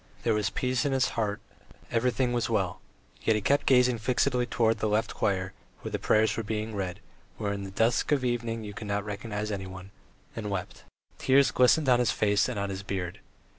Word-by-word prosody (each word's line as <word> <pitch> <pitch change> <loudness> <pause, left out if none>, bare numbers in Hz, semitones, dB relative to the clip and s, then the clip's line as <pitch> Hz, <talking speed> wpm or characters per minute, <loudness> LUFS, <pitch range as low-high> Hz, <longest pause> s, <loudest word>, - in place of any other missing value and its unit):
There 115 - +2
was 105 -1 +1
peace 125 +1 0
in 140 -2 0
his 130 -1 +2
heart, 105 -2 -2 0.5
everything 125 +1 +1
was 120 -1 0
well, 95 -5 -1 0.4
yet 110 - +2
he 105 - 0
kept 140 +5 +2
gazing 125 -2 +4
fixedly 125 +2 +1
towards 115 -1 +1
the 110 - 0
left 105 +2 0
choir, 95 -1 -1 0.3
where - - -6
the - - -2
prayers 110 0 +3
were - - -1
being 110 0 -3
read, 95 -1 -3 0.4
where 100 -1 -2
in 100 -1 -5
the - - -6
dusk 115 +8 +1
of 140 -3 +2
evening 115 -2 -1
you 105 -1 -7
could 105 +1 -7
not 100 0 -1
recognize 105 +1 -4
anyone, 95 -1 -6 0.4
and 105 -2 -4
wept. 95 -3 -5 0.3
Tears 135 0 +4
glistened 130 +4 +4
on 125 -1 +5
his 125 - +2
face 105 +2 +2
and 125 - -4
on 100 0 -2
his 95 0 -5
beard. 95 -1 -4
110 Hz, 205 wpm, -28 LUFS, 100-120 Hz, 0.5 s, on